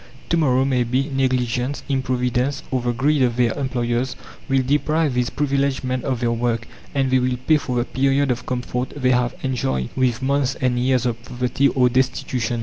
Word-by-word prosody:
To 170 Hz, -, +2 dB
morrow, 130 Hz, -4 st, +3 dB
maybe, 130 Hz, +1 st, +1 dB
negligence, 130 Hz, 0 st, 0 dB
improvidence, 130 Hz, 0 st, 0 dB
or 130 Hz, -2 st, 0 dB
the 120 Hz, 0 st, 0 dB
greed 140 Hz, +5 st, +1 dB
of 120 Hz, -2 st, +2 dB
their 120 Hz, -2 st, +2 dB
employers, 125 Hz, -2 st, -1 dB, 0.3 s
will 135 Hz, -1 st, +3 dB
deprive 150 Hz, +2 st, +1 dB
these 125 Hz, -1 st, 0 dB
privileged 140 Hz, -2 st, 0 dB
men 130 Hz, -1 st, -2 dB
of 130 Hz, -3 st, -2 dB
their 120 Hz, -1 st, +1 dB
work, 115 Hz, -1 st, -1 dB, 0.3 s
and 135 Hz, -2 st, +1 dB
they 130 Hz, -, +4 dB
will 125 Hz, 0 st, 0 dB
pay 155 Hz, -, +5 dB
for 125 Hz, -4 st, -4 dB
the 120 Hz, 0 st, +1 dB
period 135 Hz, +1 st, +1 dB
of 125 Hz, 0 st, -4 dB
comfort 125 Hz, 0 st, -3 dB
they 130 Hz, -2 st, +2 dB
have 125 Hz, -1 st, +1 dB
enjoyed 65 Hz, -, -1 dB
with 130 Hz, -1 st, +1 dB
months 140 Hz, 0 st, +1 dB
and 125 Hz, -2 st, 0 dB
years 130 Hz, 0 st, +2 dB
of 120 Hz, -1 st, -2 dB
poverty 125 Hz, +3 st, 0 dB
or 130 Hz, -2 st, +3 dB
destitution. 125 Hz, -2 st, 0 dB
130 Hz, 185 wpm, -21 LUFS, 125-135 Hz, 0.3 s, pay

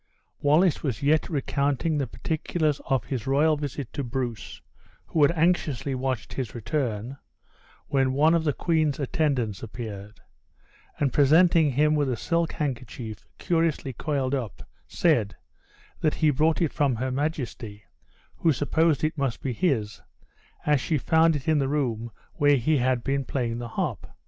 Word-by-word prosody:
Wallace 155 Hz, +3 st, +3 dB
was 130 Hz, -5 st, -3 dB
yet 155 Hz, +5 st, +2 dB
recounting 145 Hz, 0 st, 0 dB
the 135 Hz, -, -1 dB
particulars 155 Hz, +3 st, -2 dB
of 135 Hz, -5 st, +1 dB
his 130 Hz, -4 st, -4 dB
royal 150 Hz, +3 st, +3 dB
visit 145 Hz, -3 st, -5 dB
to 145 Hz, -, -3 dB
Bruce 120 Hz, -2 st, -4 dB, 0.5 s
(who 160 Hz, -, -1 dB
had 145 Hz, -, +6 dB
anxiously 155 Hz, -5 st, +1 dB
watched 130 Hz, -2 st, -3 dB
his 125 Hz, -5 st, -4 dB
return), 120 Hz, 0 st, -3 dB, 0.7 s
when 135 Hz, -2 st, +1 dB
one 155 Hz, +4 st, +4 dB
of 165 Hz, -1 st, +2 dB
the 150 Hz, -, +2 dB
queen's 155 Hz, -2 st, 0 dB
attendants 135 Hz, -, -1 dB
appeared; 105 Hz, -2 st, -8 dB, 0.8 s
and 140 Hz, -2 st, +1 dB
presenting 160 Hz, +2 st, +5 dB
him 150 Hz, +3 st, +3 dB
with 145 Hz, -3 st, +1 dB
a 125 Hz, -, -1 dB
silk 170 Hz, +5 st, 0 dB
handkerchief 120 Hz, -6 st, -5 dB
curiously 165 Hz, -5 st, 0 dB
coiled 135 Hz, 0 st, -2 dB
up, 125 Hz, -7 st, -4 dB, 0.2 s
said, 120 Hz, -, +1 dB, 0.6 s
that 155 Hz, -, +1 dB
he 155 Hz, -2 st, +3 dB
brought 155 Hz, +5 st, +2 dB
it 160 Hz, -, -1 dB
from 140 Hz, -5 st, +1 dB
her 130 Hz, +3 st, -2 dB
majesty; 125 Hz, -7 st, -4 dB, 0.5 s
who 165 Hz, -, +3 dB
supposed 155 Hz, +2 st, +1 dB
it 155 Hz, 0 st, -1 dB
must 135 Hz, -4 st, -1 dB
be 130 Hz, -, -3 dB
his, 115 Hz, -, -1 dB, 0.6 s
as 150 Hz, -3 st, +3 dB
she 155 Hz, -, 0 dB
found 160 Hz, +3 st, +3 dB
it 145 Hz, +2 st, -5 dB
in 155 Hz, -2 st, +3 dB
the 135 Hz, -1 st, 0 dB
room 120 Hz, -6 st, -1 dB, 0.2 s
where 145 Hz, 0 st, +4 dB
he 150 Hz, +5 st, +2 dB
had 125 Hz, -1 st, +1 dB
been 135 Hz, 0 st, 0 dB
playing 120 Hz, -3 st, -2 dB
the 120 Hz, -, -5 dB
harp. 110 Hz, -, -3 dB
140 Hz, 155 wpm, -26 LUFS, 125-155 Hz, 0.8 s, had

